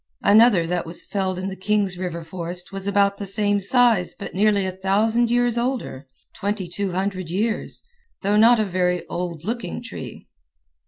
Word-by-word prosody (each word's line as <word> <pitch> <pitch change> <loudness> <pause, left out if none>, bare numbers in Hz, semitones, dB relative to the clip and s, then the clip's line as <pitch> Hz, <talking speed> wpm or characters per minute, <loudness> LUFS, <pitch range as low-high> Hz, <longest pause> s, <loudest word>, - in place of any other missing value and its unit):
Another 210 -4 +6
that 175 0 -2
was 165 - -1
felled 190 -2 -2
in 185 +1 -3
the 195 - -5
Kings 195 0 0
River 175 -2 -4
forest 175 +2 -5
was 195 0 -4
about 200 0 +2
the 200 - -4
same 205 +1 +1
size 225 -2 +3
but - - -8
nearly 205 0 +2
a 185 - -2
thousand 210 +5 +1
years 240 0 +2
older 240 - -3 0.3
(2200 190 -2 -3
years), 215 +5 -1 0.4
though 200 +2 +2
not 225 +2 +6
a 215 - +2
very 180 -1 0
old 170 -2 -4
looking 225 - -3
tree. - - -9
195 Hz, 160 wpm, -22 LUFS, 180-215 Hz, 0.4 s, Another